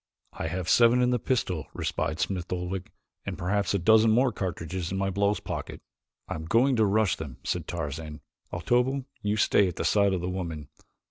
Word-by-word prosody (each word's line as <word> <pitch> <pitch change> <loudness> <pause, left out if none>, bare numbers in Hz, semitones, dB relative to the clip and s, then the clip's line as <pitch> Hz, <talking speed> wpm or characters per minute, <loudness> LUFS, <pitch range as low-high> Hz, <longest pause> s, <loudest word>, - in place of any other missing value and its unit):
"I 80 - -4
have 90 +2 -3
seven 120 +1 +5
in 125 0 +3
the 125 - +1
pistol," 95 - -1
replied 80 - -2
Smith 90 +1 -2
Oldwick, 90 +1 -3 0.3
"and - - -5
perhaps 100 +3 0
a - - +3
dozen 110 +4 +5
more 125 +3 +4
cartridges 90 -3 -4
in 95 - -2
my 95 0 0
blouse 100 +2 +1
pocket." - - -6 0.5
"I'm 80 - -5
going 120 +9 +3
to 110 - +4
rush 105 -1 +2
them," 70 -6 -7
said 85 -3 -2
Tarzan. 75 -2 -5 0.3
"Otobu, 125 +9 +1 0.2
you 105 +1 0
stay 100 -1 +4
at 90 - -4
the - - -3
side 100 -2 +3
of 90 - -1
the 90 - -3
woman. 85 -5 -4
95 Hz, 190 wpm, -27 LUFS, 85-110 Hz, 0.5 s, seven